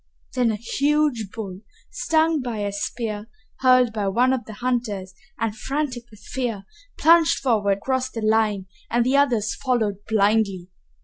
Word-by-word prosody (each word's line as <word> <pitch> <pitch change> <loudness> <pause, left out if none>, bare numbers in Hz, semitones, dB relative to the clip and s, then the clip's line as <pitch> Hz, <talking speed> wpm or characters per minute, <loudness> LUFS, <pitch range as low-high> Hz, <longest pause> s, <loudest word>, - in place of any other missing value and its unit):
Then 250 -2 +2
a 220 - 0
huge 275 -1 0
bull, 195 -4 -7 0.3
stung 320 -1 +1
by 240 -3 -4
a 200 - -2
spear 210 +1 -4 0.3
hurled 255 -3 +4
by 210 -2 -1
one 245 +6 +3
of 255 -2 -2
the 220 - -9
hunters 225 -5 -2 0.2
and 225 -2 -2
frantic 260 -2 -3
with 215 -2 -17
fear, 230 -3 -3 0.3
plunged 330 0 +5
forward 210 -6 +1
across 260 +4 -1
the 230 - -6
line 215 -3 +2 0.2
and 235 0 +2
the 260 +2 +2
others 240 -7 +2
followed 235 -7 0
blindly. 205 -4 +1
230 Hz, 150 wpm, -23 LUFS, 210-255 Hz, 0.3 s, plunged